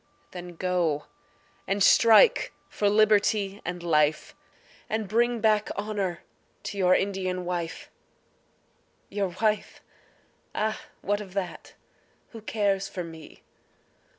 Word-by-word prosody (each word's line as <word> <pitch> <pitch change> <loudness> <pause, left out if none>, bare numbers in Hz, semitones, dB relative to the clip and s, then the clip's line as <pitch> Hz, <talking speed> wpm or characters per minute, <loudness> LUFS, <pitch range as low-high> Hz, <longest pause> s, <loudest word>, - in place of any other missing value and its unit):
Then 175 -1 -8
go 170 -4 0 0.6
and 195 0 +1
strike 230 - +6 0.2
for 205 - +1
liberty 205 -1 +3
and 175 0 -5
life, 155 -2 +1 0.6
And 220 -1 -2
bring 235 +2 +1
back 215 -1 +2
honour 200 -4 -3 0.4
to 205 - -5
your 185 -1 +5
Indian 185 -2 -1
wife. 175 -2 -4 1.2
Your 200 -1 -1
wife? 215 -1 0 0.8
Ah, 215 +4 -1 0.2
what 205 +1 0
of 195 -2 -11
that, 185 -3 -5 0.6
who 225 - -10
cares 200 -3 0
for 180 - -5
me? 160 -2 -12
195 Hz, 110 wpm, -27 LUFS, 180-215 Hz, 1.2 s, strike